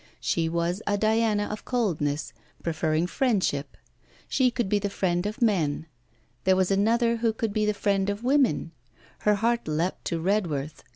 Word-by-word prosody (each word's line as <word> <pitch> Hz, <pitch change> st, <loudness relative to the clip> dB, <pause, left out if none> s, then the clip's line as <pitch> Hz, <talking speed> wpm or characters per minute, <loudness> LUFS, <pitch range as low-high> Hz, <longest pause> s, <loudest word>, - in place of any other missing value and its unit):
She 165 Hz, -1 st, 0 dB
was 170 Hz, +4 st, -1 dB
a 205 Hz, 0 st, +2 dB
Diana 220 Hz, 0 st, +2 dB
of 210 Hz, -, -6 dB
coldness, 160 Hz, -, -1 dB, 0.3 s
preferring 160 Hz, 0 st, 0 dB
friendship; 185 Hz, -, 0 dB, 0.5 s
she 260 Hz, -2 st, +3 dB
could 240 Hz, -3 st, -2 dB
be 205 Hz, +1 st, +2 dB
the 205 Hz, 0 st, -2 dB
friend 180 Hz, -1 st, 0 dB
of 215 Hz, +4 st, -2 dB
men. 165 Hz, -9 st, +1 dB, 0.6 s
There 190 Hz, 0 st, +4 dB
was 185 Hz, 0 st, +1 dB
another 230 Hz, +4 st, +2 dB
who 230 Hz, 0 st, +1 dB
could 220 Hz, -1 st, -3 dB
be 215 Hz, 0 st, +1 dB
the 210 Hz, -, +1 dB
friend 200 Hz, -1 st, +1 dB
of 205 Hz, +3 st, -3 dB
women. 260 Hz, -, +2 dB, 0.5 s
Her 210 Hz, 0 st, +3 dB
heart 235 Hz, +1 st, 0 dB
leapt 160 Hz, +4 st, -1 dB
to 170 Hz, -, -1 dB
Redworth. 160 Hz, -6 st, -1 dB
200 Hz, 165 wpm, -26 LUFS, 170-225 Hz, 0.6 s, There